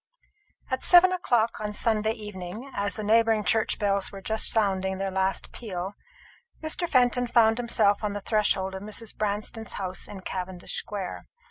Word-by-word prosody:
At 260 Hz, -, -1 dB
seven 360 Hz, +1 st, +7 dB
o'clock 240 Hz, -10 st, +1 dB
on 210 Hz, 0 st, -4 dB
Sunday 220 Hz, 0 st, +1 dB
evening, 210 Hz, +3 st, -8 dB
as 200 Hz, 0 st, -1 dB
the 215 Hz, -, -5 dB
neighbouring 225 Hz, 0 st, +3 dB
church 220 Hz, 0 st, +2 dB
bells 200 Hz, -1 st, 0 dB
were 200 Hz, -, -8 dB
just 220 Hz, +3 st, +1 dB
sounding 190 Hz, -3 st, +1 dB
their 195 Hz, 0 st, -2 dB
last 190 Hz, 0 st, -1 dB
peal, 190 Hz, -4 st, -5 dB, 0.7 s
Mr. 320 Hz, +2 st, -2 dB
Fenton 245 Hz, -1 st, +3 dB
found 225 Hz, -1 st, +4 dB
himself 215 Hz, -4 st, +2 dB
on 210 Hz, -1 st, -1 dB
the 205 Hz, -, -4 dB
threshold 195 Hz, -3 st, 0 dB
of 190 Hz, -, -6 dB
Mrs. 215 Hz, +2 st, -4 dB
Branston's 215 Hz, +1 st, -3 dB
house 185 Hz, -2 st, -3 dB
in 195 Hz, -2 st, -9 dB
Cavendish 185 Hz, -1 st, -5 dB
square. 195 Hz, -3 st, -4 dB
210 Hz, 160 wpm, -26 LUFS, 195-225 Hz, 0.7 s, seven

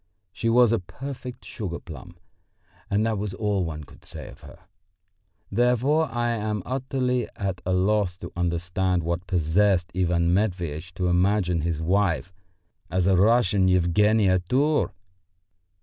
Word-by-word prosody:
She 115 Hz, +4 st, -2 dB
was 120 Hz, 0 st, +5 dB
a 115 Hz, -, +2 dB
perfect 125 Hz, +5 st, -8 dB
sugar 90 Hz, -7 st, -5 dB
plum, 75 Hz, -7 st, -11 dB, 0.7 s
and 105 Hz, +1 st, +1 dB
that 110 Hz, -3 st, 0 dB
was 100 Hz, -2 st, -4 dB
all 105 Hz, -3 st, 0 dB
one 75 Hz, -2 st, -5 dB
could 70 Hz, -, -17 dB
say -, -, -8 dB
of -, -, -14 dB
her. -, -, -13 dB, 0.9 s
Therefore 125 Hz, +6 st, +2 dB
I 120 Hz, 0 st, 0 dB
am 105 Hz, -3 st, -2 dB
utterly 125 Hz, -2 st, -1 dB
at 95 Hz, -2 st, -3 dB
a 95 Hz, -, +1 dB
loss 95 Hz, -1 st, +1 dB
to 90 Hz, -2 st, -8 dB
understand 90 Hz, +1 st, 0 dB
what 85 Hz, +2 st, -3 dB
possessed 90 Hz, +1 st, +2 dB
Ivan 85 Hz, -2 st, +2 dB
Matveitch 90 Hz, -4 st, -1 dB
to 90 Hz, -, -2 dB
imagine 90 Hz, -1 st, +2 dB
his 80 Hz, -1 st, -2 dB
wife 95 Hz, 0 st, +1 dB, 0.6 s
as 90 Hz, 0 st, 0 dB
a 95 Hz, 0 st, +4 dB
Russian 100 Hz, -1 st, +4 dB
Yevgenia 95 Hz, +2 st, +3 dB
Tour? 145 Hz, +4 st, +2 dB
95 Hz, 140 wpm, -25 LUFS, 90-110 Hz, 0.9 s, was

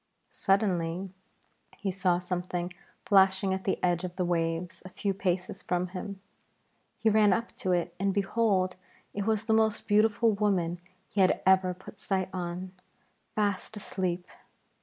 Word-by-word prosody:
Suddenly 190 Hz, -2 st, 0 dB, 0.7 s
he 200 Hz, -1 st, -2 dB
saw 185 Hz, -2 st, +2 dB
something 180 Hz, 0 st, -3 dB, 0.3 s
flashing 190 Hz, -1 st, +4 dB
at 190 Hz, 0 st, -4 dB
the 190 Hz, -, +1 dB
edge 175 Hz, -1 st, +2 dB
of 180 Hz, -1 st, -5 dB
the 180 Hz, -, 0 dB
waves 165 Hz, 0 st, -1 dB
a 185 Hz, -, -9 dB
few 195 Hz, +2 st, -2 dB
paces 180 Hz, -1 st, -2 dB
from 180 Hz, 0 st, -1 dB
him. 195 Hz, +1 st, -6 dB, 0.8 s
He 225 Hz, -, -1 dB
ran 210 Hz, -2 st, +5 dB
up 230 Hz, +3 st, -2 dB
to 185 Hz, -, -1 dB
it 175 Hz, -1 st, 0 dB
and, 195 Hz, +1 st, +2 dB
behold, 195 Hz, -2 st, +1 dB, 0.4 s
it 205 Hz, +1 st, -3 dB
was 220 Hz, -1 st, +1 dB
the 220 Hz, -, +2 dB
most 220 Hz, -1 st, +2 dB
beautiful 220 Hz, +2 st, +4 dB
woman 185 Hz, -4 st, 0 dB, 0.3 s
he 200 Hz, -, 0 dB
had 185 Hz, -, +4 dB
ever 185 Hz, -1 st, +4 dB
put 190 Hz, +2 st, -13 dB
sight 190 Hz, -2 st, -1 dB
on, 180 Hz, 0 st, -4 dB, 0.6 s
fast 205 Hz, 0 st, -1 dB
asleep. 185 Hz, -3 st, -2 dB
190 Hz, 150 wpm, -29 LUFS, 180-205 Hz, 0.8 s, ran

